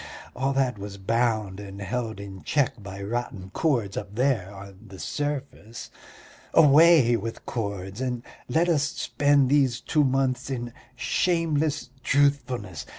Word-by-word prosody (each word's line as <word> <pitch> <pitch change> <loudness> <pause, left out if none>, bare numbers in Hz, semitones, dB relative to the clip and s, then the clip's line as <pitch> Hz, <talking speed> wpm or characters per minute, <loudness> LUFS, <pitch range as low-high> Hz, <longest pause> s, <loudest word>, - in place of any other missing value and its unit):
All 135 +2 0
that 130 -5 0
was 100 0 -7
bound 110 -1 0
and 100 -1 -9
held 110 +2 -3
in 100 -2 -8
check 135 -6 0
by 100 0 -8
rotten 100 -4 -4
cords 115 -8 0
up 100 0 -6
there 120 -6 +1
on 100 -1 -11
the 95 -1 -11
surface. 140 -6 -5 0.6
Away 150 -4 +7
with 115 +1 -5
cords 100 -2 -4
and 125 -2 -2 0.3
let 165 +7 +2
us 160 -5 +3
spend 145 -2 +2
these 135 -3 +3
two 150 - +1
months 130 -1 0
in 120 -3 -4 0.2
shameless 155 -2 0
truthfulness! 130 - 0
120 Hz, 135 wpm, -26 LUFS, 100-140 Hz, 0.6 s, Away